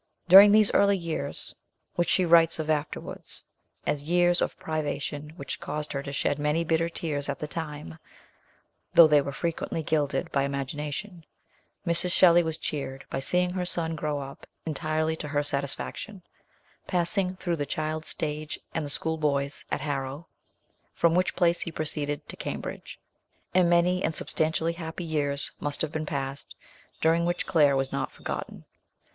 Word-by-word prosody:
During 195 Hz, +3 st, +10 dB
these 215 Hz, -1 st, +6 dB
early 200 Hz, 0 st, +4 dB
years, 170 Hz, -3 st, -4 dB, 0.4 s
which 175 Hz, -, 0 dB
she 185 Hz, -, +3 dB
writes 165 Hz, -1 st, +5 dB
of 155 Hz, -1 st, -1 dB
afterwards 150 Hz, 0 st, -4 dB, 0.4 s
as 145 Hz, -, 0 dB
years 175 Hz, +2 st, +3 dB
of -, -, -1 dB
privation 150 Hz, -1 st, -3 dB
which 140 Hz, -6 st, -5 dB
caused 150 Hz, +1 st, -4 dB
her 140 Hz, -, -2 dB
to 140 Hz, -, -6 dB
shed 145 Hz, +1 st, 0 dB
many 150 Hz, +3 st, +1 dB
bitter 165 Hz, +1 st, +1 dB
tears 150 Hz, -4 st, -3 dB
at -, -, -2 dB
the -, -, -4 dB
time, 155 Hz, 0 st, -6 dB, 1.0 s
though 170 Hz, -, +10 dB
they 150 Hz, -2 st, +5 dB
were 140 Hz, -, -4 dB
frequently 165 Hz, +1 st, -3 dB
gilded 145 Hz, -2 st, 0 dB
by 140 Hz, -, +2 dB
imagination, 145 Hz, +6 st, -4 dB, 0.6 s
Mrs. 170 Hz, +1 st, +2 dB
Shelley 175 Hz, -1 st, +6 dB
was 160 Hz, -1 st, -2 dB
cheered 135 Hz, -4 st, -4 dB
by -, -, -1 dB
seeing 180 Hz, +6 st, +1 dB
her 180 Hz, 0 st, -2 dB
son 165 Hz, -2 st, 0 dB
grow 150 Hz, -1 st, -2 dB
up 140 Hz, 0 st, -9 dB, 0.2 s
entirely 155 Hz, 0 st, -1 dB
to 150 Hz, -, -5 dB
her 145 Hz, 0 st, 0 dB
satisfaction, 145 Hz, +8 st, -3 dB, 0.6 s
passing 180 Hz, +1 st, 0 dB
through 175 Hz, -2 st, -2 dB
the 145 Hz, -1 st, -2 dB
child's 155 Hz, 0 st, -3 dB
stage 150 Hz, 0 st, -4 dB
and 160 Hz, -, -1 dB
the 145 Hz, -, -5 dB
school 160 Hz, +2 st, 0 dB
boy's 140 Hz, -2 st, 0 dB
at -, -, -2 dB
Harrow, 140 Hz, +1 st, -3 dB, 0.7 s
from 170 Hz, -1 st, +3 dB
which 180 Hz, +1 st, +1 dB
place 175 Hz, -1 st, +2 dB
he 170 Hz, -, -4 dB
proceeded 150 Hz, -2 st, -1 dB
to -, -, -6 dB
Cambridge; -, -, -6 dB, 0.5 s
and 180 Hz, -1 st, +4 dB
many 180 Hz, +1 st, +3 dB
and 160 Hz, -, 0 dB
substantially 160 Hz, +1 st, 0 dB
happy 165 Hz, +1 st, -6 dB
years 145 Hz, -3 st, 0 dB
must 145 Hz, +1 st, -2 dB
have 155 Hz, -, -2 dB
been 155 Hz, -1 st, -3 dB
passed, 140 Hz, -1 st, -4 dB, 0.5 s
during 165 Hz, +1 st, +3 dB
which 175 Hz, +1 st, -1 dB
Claire 150 Hz, -6 st, +4 dB
was 135 Hz, 0 st, -1 dB
not -, -, -2 dB
forgotten. -, -, -6 dB
155 Hz, 165 wpm, -27 LUFS, 145-170 Hz, 1.0 s, During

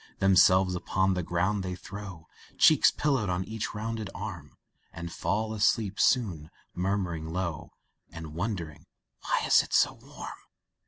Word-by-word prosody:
Themselves 95 Hz, -1 st, +5 dB
upon 95 Hz, +1 st, 0 dB
the 90 Hz, -, -1 dB
ground 95 Hz, +4 st, 0 dB
they 90 Hz, -1 st, -4 dB
throw, 95 Hz, -3 st, -9 dB, 0.3 s
Cheeks -, -, +6 dB
pillowed 135 Hz, -9 st, 0 dB
on 90 Hz, +1 st, -1 dB
each 110 Hz, +1 st, -5 dB
rounded 110 Hz, -1 st, -4 dB
arm 85 Hz, -9 st, -7 dB, 0.3 s
And 85 Hz, 0 st, -7 dB
fall 110 Hz, +2 st, -1 dB
asleep 105 Hz, -1 st, +1 dB
soon, 90 Hz, -, +2 dB, 0.2 s
murmuring 90 Hz, -3 st, -2 dB
low, 85 Hz, -2 st, -4 dB, 0.4 s
And 80 Hz, -2 st, -8 dB
wondering 85 Hz, -4 st, -4 dB, 0.3 s
"why -, -, 0 dB
it -, -, -4 dB
is -, -, -8 dB
so -, -, +3 dB
warm?" -, -, -10 dB
95 Hz, 140 wpm, -28 LUFS, 85-105 Hz, 0.4 s, Cheeks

